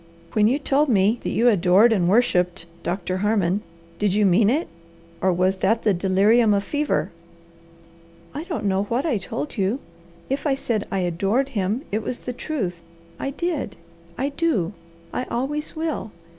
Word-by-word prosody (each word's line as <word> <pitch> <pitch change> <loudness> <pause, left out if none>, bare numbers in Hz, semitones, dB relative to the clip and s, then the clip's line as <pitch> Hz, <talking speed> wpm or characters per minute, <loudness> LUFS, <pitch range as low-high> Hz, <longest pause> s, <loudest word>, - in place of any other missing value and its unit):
When 210 -1 +4
you 255 +5 +2
told 290 0 +1
me 210 +1 +3
that - - -3
you 240 - +2
'adored 200 +2 +5
and 180 -5 +2
worshipped' 180 -5 +2 0.2
Doctor 185 0 -2
Harmon, 205 -1 +1 0.4
did 205 -2 +1
you 210 0 +3
mean 200 +3 +4
it, 300 +8 +1 0.5
or 185 - +3
was 185 +2 +1
that 220 +5 +1
the 210 - +3
delirium 205 +5 +4
of 200 - 0
fever?" 290 - -1 1.2
"I 300 +4 -5
don't 330 - -4
know 195 0 +1
WHAT 240 +7 -1
I 260 -10 +1
told 145 -5 -5
you! 200 +6 0 0.5
If 275 +3 -2
I 275 - +2
said 225 -5 -2
I 195 - -1
'adored' 195 +10 0
him, 215 +1 -1
it 215 +2 0
was 240 - -4
the 250 - -6
truth. 205 - -3 0.4
I - - -2
did! 300 - -3 0.4
I 275 +2 0
do! 280 - 0 0.4
I 255 - -2
always 280 +7 -3
will! 315 -7 -3
215 Hz, 170 wpm, -23 LUFS, 190-270 Hz, 1.2 s, adored